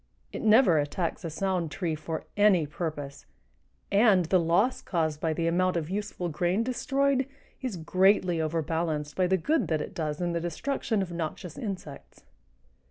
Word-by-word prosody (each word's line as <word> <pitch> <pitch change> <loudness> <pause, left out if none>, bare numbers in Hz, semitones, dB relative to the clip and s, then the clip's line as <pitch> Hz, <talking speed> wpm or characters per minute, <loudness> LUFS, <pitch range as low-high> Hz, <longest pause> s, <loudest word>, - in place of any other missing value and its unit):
It - - -4
never 215 - +5
attacks 165 +5 -2
a 165 - -3
sound 180 0 -1
tree 165 +1 -2
for 160 +1 -4
any 205 -6 +4
purpose, 145 - -5 0.6
and 200 -3 +5
the 185 +3 +3
loss 175 +9 +2
caused 160 -4 -1
by 160 - +1
the 165 +1 -1
amount 180 +2 +2
of 165 +1 -3
useful 205 -3 -3
grain 175 +6 0
destroyed 270 +1 +1 0.3
is 250 -8 -3
greatly 185 0 +3
overbalanced 160 -1 -2
by 185 -1 +2
the 190 +1 +3
good 310 - +1
that 160 -2 0
it - - -5
does 155 -2 -3
in 175 -1 -1
the 170 - -1
destruction 205 - -1
of 180 - -7
noxious 170 +1 -5
insects. 195 - -7
175 Hz, 165 wpm, -28 LUFS, 160-200 Hz, 0.6 s, never